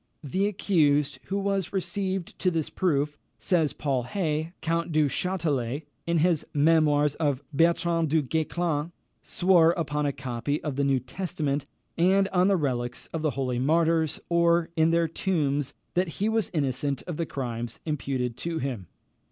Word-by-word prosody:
The 190 +8 0
accused 150 -8 +2
who 195 - -2
was 195 -2 -1
received 190 -1 -3
to 185 - +2
this 165 -3 -2
proof, 150 -4 0 0.2
says 165 -5 +1
Paul 135 -4 -1
Hay, 155 +3 -2
Count 165 +1 -1
du 155 -1 +3
Chastelet, 150 -6 -1 0.2
in 170 0 +2
his 165 -1 +2
Memoirs 150 -1 +4
of 145 -4 0
Bertrand 165 +1 +2
du 155 0 +2
Guesclin, 160 +2 -1 0.3
swore 175 -2 +4
upon 150 -3 -1
a - - +1
copy 130 +2 -3
of 150 -4 -3
the 140 - +1
New 135 -1 +2
Testament, 145 0 -3 0.3
and 190 +3 +4
on 185 0 +3
the 200 -1 +3
relics 125 -5 -2
of 165 - -2
the 155 - +1
holy 125 -2 -1
martyrs, 160 +2 +2
or 170 -1 +3
on 160 0 +4
their 165 0 +2
tombs, 145 -5 -1 0.2
that 180 +1 +1
he 205 - +1
was 220 -1 +1
innocent 140 -3 -1
of 175 -4 -5
the 165 - -2
crime 120 -3 -3 0.2
imputed 135 -5 -2
to 170 -1 -3
him. 125 - -4
155 Hz, 160 wpm, -27 LUFS, 140-170 Hz, 0.3 s, Memoirs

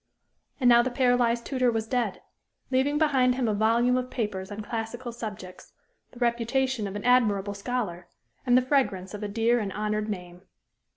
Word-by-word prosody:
And 250 - +2
now 240 -1 +7
the 250 - -1
paralyzed 245 -2 +2
tutor 255 -2 +1
was 225 -2 -1
dead, 235 -4 -2 0.5
leaving 270 +3 +2
behind 265 -5 +3
him 250 -2 0
a 215 - +1
volume 230 +4 +2
of 255 0 -3
papers 205 -6 -3
on 205 +1 -6
classical 230 +3 -5
subjects, 210 -6 -8 0.4
the - - -17
reputation 240 0 0
of 195 - -7
an 205 - -5
admirable 210 -5 +3
scholar, 200 -5 -4 0.4
and 245 -1 +4
the 255 - +3
fragrance 230 -9 0
of 210 - -6
a 210 - -2
dear 230 +3 +1
and 205 -3 -3
honored 210 +1 -2
name. 180 -3 -6
235 Hz, 175 wpm, -27 LUFS, 205-250 Hz, 0.5 s, now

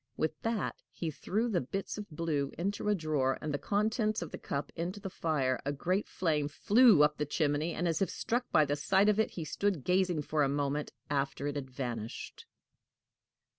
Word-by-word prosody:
With 155 0 -1
that 225 -2 -1
he 165 -2 -4
threw 205 - -1
both 235 - -2
the 175 - +2
bits 195 +10 -4
of 210 -2 -7
blue 150 -3 -1
into 200 +4 -1
a 210 - +4
drawer, 150 -6 0
and 150 -1 -3
the 145 - -1
contents 215 0 0
of 165 - -8
the - - -6
cup 140 +1 -3
into 180 +5 -3
the 195 -1 -6
fire. 135 -7 0
A 140 - -1
great 180 +8 -1
flame 155 -5 0
flew 205 - +6
up 150 0 +2
the 150 - +1
chimney, 150 +1 0
and, 175 - 0
as 165 +3 0
if 190 - +2
struck 245 +2 -1
at 150 - +6
the 145 - +1
sight 190 +7 +3
of 210 0 +2
it, 220 - +3
he 165 - -3
stood 195 -4 -1
gazing 180 -4 +2
for 155 +1 0
a 140 - +3
moment 145 +1 -1 0.2
after 140 -1 -1
it 145 0 -2
had 135 -2 -4
vanished. 120 -4 -5
155 Hz, 210 wpm, -32 LUFS, 145-195 Hz, 0.2 s, flew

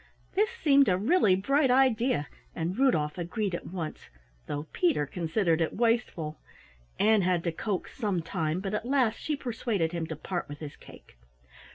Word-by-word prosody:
This 420 +3 +2
seemed 285 - +4
a 180 - +3
really 215 - +4
bright 275 +8 +2
idea, 250 - +3 0.3
and 170 +3 -2
Rudolf 185 - +1
agreed 190 +3 -2
at 175 - -4
once, 165 -4 -6 0.4
though 145 +1 -3
Peter 335 - +2
considered 170 +2 0
it 160 - 0
wasteful. 225 -10 0 0.6
Ann 215 0 +4
had 180 -2 +1
to 170 - 0
coax 190 +3 -4
some 200 -8 -1
time, 160 +1 -2
but 195 +1 -4
at 210 - -1
last 255 -5 +2
she 305 - -2
persuaded 225 - -2
him 170 -2 -3
to 160 - -5
part 175 +3 -4
with 145 - -7
his 145 -1 -8
cake. - - -16
195 Hz, 170 wpm, -28 LUFS, 165-245 Hz, 0.6 s, seemed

